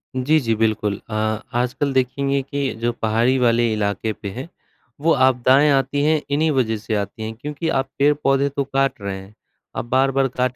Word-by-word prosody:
जी, 145 +5 +2
जी, 115 -5 0
बिल्कुल। 105 -2 0
अ, - - -6 0.4
आजकल 125 +4 -1
देखेंगे 135 +2 0
कि 140 0 -3
जो 120 +1 +1
पहाड़ी 115 +4 +2
वाले 120 -1 +3
इलाके 105 +1 -1
पे 100 - -7
हैं, 125 +10 -7 0.5
वो 165 +2 +4
आपदाएँ 130 +2 +4
आती 140 +1 +1
हैं 155 0 +2
इन्हीं 155 +2 +2
वजह 120 -6 +1
से 110 +1 -3
आती 105 +2 -4
हैं 110 - -4
क्योंकि 150 +6 -4
आप 135 -3 0
पेड़-पौधे 140 -1 +2
तो 140 0 -2
काट 135 -3 -1
रहे 100 -1 -4
हैं। 95 +2 -12 0.4
आप - - -3
बार-बार 135 +2 +2
काट 125 0 0
130 Hz, 180 wpm, -21 LUFS, 115-140 Hz, 0.5 s, वो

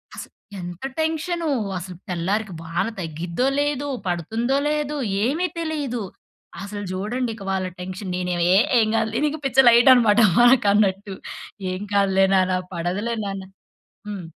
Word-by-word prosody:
అస - - -6 0.4
ఎంత 175 +2 -8 0.2
టెన్షనో, 320 +2 -1 0.3
అసలు 180 +1 -7
తెల్లారికి 190 +4 -1
వాన 165 +1 -2
తగ్గిద్దో 170 +6 -3
లేదో, 290 -1 -1 0.2
పడుతుందో 225 - -1
లేదో 300 -1 -1 0.3
ఏమి 320 +9 0
తెలీదు. 295 -7 -3 0.6
అసలు 205 +1 -6
జూడండి 220 +6 -2
ఇక 200 - -10
వాళ్ళ 190 -1 -1
టెన్షన్. 185 +1 -6
నేనేవి 180 -1 -1
ఏ - - +6 0.2
ఏం 220 - +3
గాదులే 225 0 0
నీకు. 305 +1 -2
పిచ్చ 265 -1 -2
లైటనమాట 235 -2 +6 0.2
వారికన్నట్టు. 205 -5 +4 0.6
"ఏం 185 +1 -4
కాదులే 195 -1 +3
నాన్న. 185 -1 +3 0.2
పడదులే 185 +7 -2
నాన్న." 195 -1 -4 0.7
హ్మ్. 200 -4 -5
205 Hz, 130 wpm, -22 LUFS, 185-255 Hz, 0.7 s, ఏ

